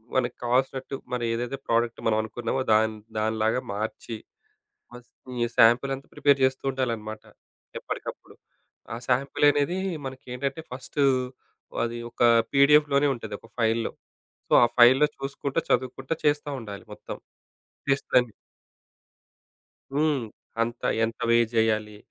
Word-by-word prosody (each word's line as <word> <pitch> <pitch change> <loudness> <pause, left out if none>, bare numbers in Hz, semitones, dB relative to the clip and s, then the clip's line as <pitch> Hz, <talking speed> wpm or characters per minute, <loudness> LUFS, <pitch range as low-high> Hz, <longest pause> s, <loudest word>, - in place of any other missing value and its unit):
మనకు 125 -2 +1
కావాల్సినట్టు, 130 +2 0 0.2
మనం 120 -1 -1
ఏదైతే 120 +3 -3
ప్రోడక్ట్ 115 0 +1
మనం 110 -1 +3
అనుకున్నామో 115 +4 -3
దాని 110 0 +2 0.2
దానిలాగా 110 +2 +1
మార్చి, 110 +2 -4 0.8
ఫస్ట్ 120 0 -14 0.3
ఈ - - +1
సాంపిల్ 120 +4 +5
అంతా 135 - -14
ప్రిపేర్ 140 -1 +3
జేస్తుండాలన్నమాట, 130 -5 -1 0.5
ఎప్పటికప్పుడు. - - -7 0.6
ఆ - - -4
సాంపిల్ 135 +3 +2
అనేది 145 +6 0 0.3
మనకేంటంటే, 130 +3 -5
ఫస్టు 130 +3 -3 0.8
అది 120 0 -4
ఒక - - -3 0.3
పిడిఎఫ్‌లోనే 145 0 +5
ఉంటది. 110 -4 -7
ఒక 115 - -17
ఫైల్‌లో. 115 0 +1 0.6
సో, - - -6
ఆ - - +6
ఫైల్‌లో 130 +5 +7
చూసుకుంటా 140 +2 -2
చదువుకుంటా 130 +3 0
చేస్తా 145 0 +1
ఉండాలి 100 -3 -8
మొత్తం. - - -8 0.7
టెస్టులు 135 -1 +2
అన్ని 120 -3 -3 1.6
హ్మ్. 145 -4 +1 0.4
అంత 120 +1 -4 0.2
ఎంత 115 +1 -4
వేజ్ 115 0 +3
ఎయ్యాలి? 110 -1 -1
125 Hz, 115 wpm, -26 LUFS, 115-135 Hz, 1.6 s, ఫైల్‌లో